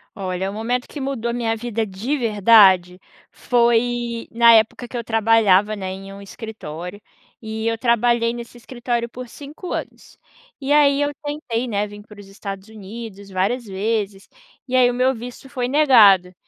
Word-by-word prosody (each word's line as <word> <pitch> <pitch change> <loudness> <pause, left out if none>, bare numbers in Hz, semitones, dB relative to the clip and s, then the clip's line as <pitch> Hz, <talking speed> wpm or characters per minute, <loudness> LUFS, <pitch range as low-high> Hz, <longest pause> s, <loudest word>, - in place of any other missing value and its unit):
Olha, 190 -1 -3
o - - -7
momento 245 +3 -2
que 295 - -9
mudou 265 -4 -3
a - - -4
minha 230 -2 -1
vida 225 -1 -3
de 215 +10 -3
verdade, 200 -6 +4 0.3
foi 235 -1 0
na 235 0 +6
época 225 +2 +2
que 245 - -6
eu 235 - -4
trabalhava, 215 -2 +3
né, 190 -2 -6
em 195 +1 -9
um 200 - -11
escritório. 200 -3 -8 0.4
E 220 0 -4
eu 230 - 0
trabalhei 235 0 +2
nesse 240 0 -9
escritório 240 0 -3
por 250 +2 -9
5 295 +8 -10
anos. - - -7 0.4
E 280 0 0
aí 285 -1 +4
eu 290 0 0
tentei, 290 -5 -3
né, 205 -3 -1
vim 205 0 -11
pros 205 -1 -14
Estados 195 0 -8
Unidos 215 -1 -10
várias 195 +7 -1
vezes 200 0 -3 0.4
e 255 - -2
aí 250 -1 +5
o - - -2
meu 255 +2 +2
visto 245 +2 -9
foi 250 -1 -3
negado. 220 - +5
225 Hz, 170 wpm, -21 LUFS, 200-245 Hz, 0.4 s, na